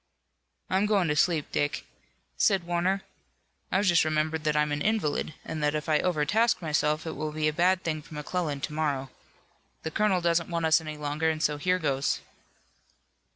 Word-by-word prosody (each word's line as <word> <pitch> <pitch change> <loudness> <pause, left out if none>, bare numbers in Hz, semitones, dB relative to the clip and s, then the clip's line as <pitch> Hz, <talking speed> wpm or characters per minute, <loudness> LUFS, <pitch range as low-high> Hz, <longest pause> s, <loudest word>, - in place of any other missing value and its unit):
"I'm 190 +2 +1
going 200 -6 +2
to 150 - +1
sleep, 155 0 +1
Dick," 145 0 -1 0.5
said 195 -4 +3
Warner. 175 +3 0 0.7
"I've 195 +2 +2
just 175 -3 +5
remembered 155 0 -1
that 150 -1 +2
I'm 150 0 +2
an 145 0 -1
invalid 155 -7 0
and 155 - -4
that 150 0 +1
if 150 +1 -3
I 155 -1 +3
overtask 180 +8 +2
myself 155 -1 0
it 160 - -3
will 155 +1 -3
be 155 0 0
a 155 - +1
bad 180 +3 +2
thing 155 -2 -2
for 150 - -12
McClellan 150 -1 -3
to 150 - -4
morrow. 140 -4 -1 0.7
The 160 - -3
colonel 210 -2 +2
doesn't 170 0 +1
want 170 -1 -1
us 160 +1 +4
any 155 -1 -6
longer, 150 +2 -1
and 155 -1 -2
so 150 -1 +1
here 180 +5 +1
goes." 140 -5 0
155 Hz, 185 wpm, -28 LUFS, 150-180 Hz, 0.7 s, just